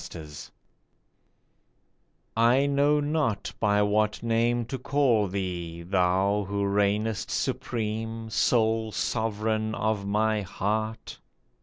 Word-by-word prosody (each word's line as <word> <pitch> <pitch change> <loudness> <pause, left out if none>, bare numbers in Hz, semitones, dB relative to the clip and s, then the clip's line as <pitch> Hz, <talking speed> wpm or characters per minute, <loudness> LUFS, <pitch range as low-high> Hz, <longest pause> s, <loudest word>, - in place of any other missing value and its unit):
THE - - -9
NAME 75 -1 -9 2.1
I 120 +4 +4
KNOW 140 +1 +3
not 145 -8 -1
by 105 -1 +3
what 105 +2 +1
name 115 +1 +1
to 130 +3 -5
call 125 -6 +2
thee, 90 -3 -4
thou 95 +3 +1
Who 100 0 -1
reignest 105 +2 0
supreme, 110 0 -3
sole 110 -1 +2
sovereign 110 0 -1
of 110 -2 -1
my 105 +1 +1
heart 110 +4 -3
110 Hz, 105 wpm, -27 LUFS, 100-115 Hz, 2.1 s, I